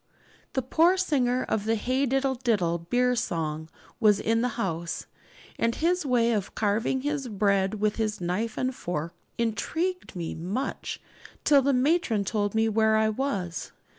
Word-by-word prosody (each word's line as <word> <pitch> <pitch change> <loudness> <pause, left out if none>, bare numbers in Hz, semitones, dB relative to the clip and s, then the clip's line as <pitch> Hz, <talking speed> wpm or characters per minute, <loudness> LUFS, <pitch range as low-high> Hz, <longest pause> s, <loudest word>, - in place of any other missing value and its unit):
The 265 - 0
poor 330 +8 +4
singer 255 -8 +1
of 210 -1 -1
the 225 +1 +2
'Hey 255 +5 0
diddle 270 +1 +1
diddle' 210 -10 0
beer 250 0 +3
song 160 -8 -2 0.3
was 210 -3 +5
in 225 +1 +1
the 250 - +2
house, 170 -6 -2 0.5
and 230 0 +1
his 345 -1 +1
way 235 -2 +3
of 205 -4 -2
carving 220 +5 +1
his 290 -1 -2
bread 200 -2 +1
with 215 0 0
his 215 -2 -1
knife 185 +6 -2
and 255 +1 0
fork 170 -6 -4 0.2
'intrigued' 325 - -2
me 170 -2 -3
much 195 +11 -4 0.4
till 285 -2 +6
the 280 +1 +2
matron 255 - +2
told 205 0 -1
me 220 0 +3
where 220 0 +3
I 220 0 +3
was. 210 -8 -3
225 Hz, 160 wpm, -27 LUFS, 200-260 Hz, 0.5 s, till